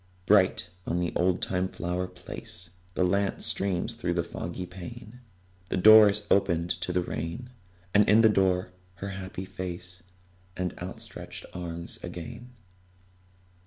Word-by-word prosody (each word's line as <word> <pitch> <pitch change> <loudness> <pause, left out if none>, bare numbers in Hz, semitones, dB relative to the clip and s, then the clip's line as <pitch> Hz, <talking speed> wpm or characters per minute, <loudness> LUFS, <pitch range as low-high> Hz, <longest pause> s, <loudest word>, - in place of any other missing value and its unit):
Bright 95 -3 +4 0.2
on 85 - 0
the 90 -1 -1
oldtime 90 +1 +1
flower 90 +1 -3
place 90 -1 -7 0.2
The - - +2
lamp 100 +2 +1
streams 100 +3 -1
through 90 -7 -2
the 85 - +1
foggy 85 +2 -5
pane; 110 +6 -10 0.5
The - - 0
door 110 +2 +9
is 105 +1 -1
opened 85 -3 +3
to - - -1
the 90 0 +1
rain: 85 +12 -5 0.4
And 105 0 +5
in 110 +2 +7
the 110 - +7
door 95 -3 +2 0.2
her 100 +2 -5
happy 95 -1 -6
face 90 -1 -6 0.6
And 90 -1 -1
outstretched 90 +1 -8
arms 85 -1 -5
again. 120 +7 -7
90 Hz, 135 wpm, -28 LUFS, 90-100 Hz, 0.6 s, door